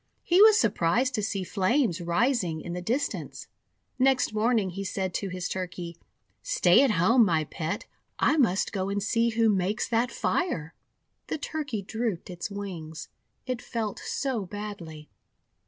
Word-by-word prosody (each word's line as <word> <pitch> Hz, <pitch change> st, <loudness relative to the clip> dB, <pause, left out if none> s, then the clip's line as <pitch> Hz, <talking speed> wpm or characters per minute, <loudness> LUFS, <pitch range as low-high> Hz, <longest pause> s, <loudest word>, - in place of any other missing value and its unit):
He 360 Hz, +2 st, +4 dB
was 430 Hz, 0 st, +8 dB
surprised 225 Hz, +5 st, +2 dB
to 215 Hz, -, 0 dB
see 200 Hz, -1 st, -2 dB
flames 190 Hz, -, +1 dB
rising 175 Hz, -1 st, +1 dB
in 170 Hz, +2 st, -6 dB
the 180 Hz, -, -4 dB
distance. 250 Hz, +10 st, -2 dB, 0.5 s
Next 255 Hz, -3 st, +3 dB
morning 215 Hz, -3 st, +1 dB
he 195 Hz, +3 st, -5 dB
said 190 Hz, -1 st, -3 dB
to 200 Hz, -, -2 dB
his 180 Hz, -1 st, -3 dB
Turkey: 180 Hz, -2 st, -5 dB, 0.2 s
— -, -, -45 dB
:'Stay 225 Hz, -, +4 dB
at 275 Hz, -, +4 dB
home, 220 Hz, +6 st, +4 dB
my 165 Hz, -6 st, +2 dB
Pet. 155 Hz, +2 st, -4 dB, 0.3 s
I -, -, +3 dB
must 210 Hz, -9 st, +2 dB
go 190 Hz, -1 st, -1 dB
and 200 Hz, 0 st, -1 dB
see 230 Hz, +2 st, +2 dB
who 230 Hz, 0 st, +2 dB
makes 200 Hz, 0 st, +1 dB
that 235 Hz, +1 st, +1 dB
fire." 180 Hz, -, -1 dB, 0.5 s
The -, -, -2 dB
Turkey 290 Hz, -8 st, -4 dB
drooped 220 Hz, -4 st, -3 dB
its 175 Hz, +3 st, -5 dB
wings, 180 Hz, -6 st, -7 dB, 0.4 s
it 255 Hz, -2 st, -3 dB
felt 220 Hz, -4 st, -3 dB
so 260 Hz, -7 st, -2 dB
badly. 180 Hz, -6 st, -7 dB
205 Hz, 155 wpm, -27 LUFS, 180-240 Hz, 0.5 s, was